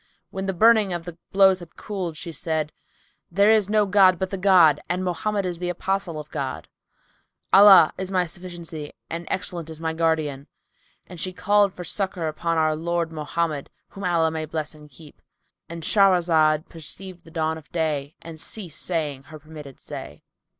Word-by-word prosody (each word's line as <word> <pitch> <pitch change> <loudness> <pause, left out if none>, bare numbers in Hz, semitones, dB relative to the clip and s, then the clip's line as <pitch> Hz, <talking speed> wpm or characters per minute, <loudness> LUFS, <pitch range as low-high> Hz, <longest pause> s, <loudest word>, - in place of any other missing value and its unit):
When 190 0 -4
the 195 - 0
burning 220 +1 +5
of 170 -1 -4
the 175 -1 -9
blows 190 -1 +5
had 175 -2 -13
cooled, 185 -7 -5
she 170 - -6
said, 155 -1 -2 0.6
"There 200 +4 +4
is 215 -3 +3
no 210 0 +3
god 190 -2 +5
but 190 +2 -3
the 195 - -3
God 175 -6 +5
and 180 +1 -1
Mohammed 195 +3 -1
is 175 -2 -4
the 180 0 -2
Apostle 180 -2 -2
of 150 0 -10
God! 140 -3 -4 0.9
Allah 195 -5 +8
is 190 -1 -3
my 185 -2 +1
sufficiency 170 -3 -8 0.2
and 170 +1 -5
excellent 175 -3 -3
is 160 -1 -8
my 160 0 -2
Guardian!" 155 -4 -1 0.6
And 180 -2 -11
she 185 - -2
called 200 +2 +3
for 180 - -8
succour 185 -1 -2
upon 165 +2 -2
our 155 -1 +2
Lord 170 +1 -2
Mohammed 155 -1 -3 0.2
(whom 195 - -10
Allah 160 -3 0
bless 155 -1 -4
and 150 -1 -15
keep!)—And 160 +3 -14
Shahrazad 165 -6 +3
perceived 175 +3 -9
the - - -15
dawn 160 -1 -2
of 150 - -22
day 155 -3 -2
and 165 -1 -9
ceased 175 -4 -7
saying 150 -6 -3
her 155 +1 -11
permitted 150 -3 -12
say. 75 - -9
170 Hz, 170 wpm, -24 LUFS, 155-185 Hz, 0.9 s, Allah